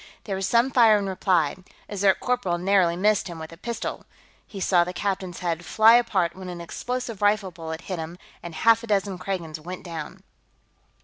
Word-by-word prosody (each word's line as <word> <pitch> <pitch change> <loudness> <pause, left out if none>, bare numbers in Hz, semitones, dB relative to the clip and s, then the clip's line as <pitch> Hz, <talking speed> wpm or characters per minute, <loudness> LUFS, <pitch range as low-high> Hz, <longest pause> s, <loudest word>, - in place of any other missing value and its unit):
There 195 - -3
was 190 0 -2
some 235 +3 +3
fire 225 -4 +6
in 200 - -2
reply; 180 -5 +1 0.3
a 205 - -7
Zirk 195 -1 +3
corporal 245 -9 0
narrowly 180 -1 +3
missed 205 +2 +2
him 170 -2 -7
with 160 0 -8
a - - -10
pistol, 230 +4 -5 0.4
he 200 - -8
saw 180 -2 +3
the 180 +1 -5
captain's 190 -2 -3
head 170 -1 -2
fly 220 +6 +5
apart 195 -8 +2
when 185 -1 -8
an 175 -1 -6
explosive 245 +5 -5
rifle 205 -2 +2
bullet 160 -1 -7
hit 185 -2 -5
him, 160 +2 -6 0.2
and 170 -2 -8
half 230 +4 +4
a 230 - -9
dozen 195 -3 0
Kragans 175 -4 -4
went 180 +4 -8
down. 165 -4 -7
190 Hz, 195 wpm, -25 LUFS, 170-210 Hz, 0.4 s, fire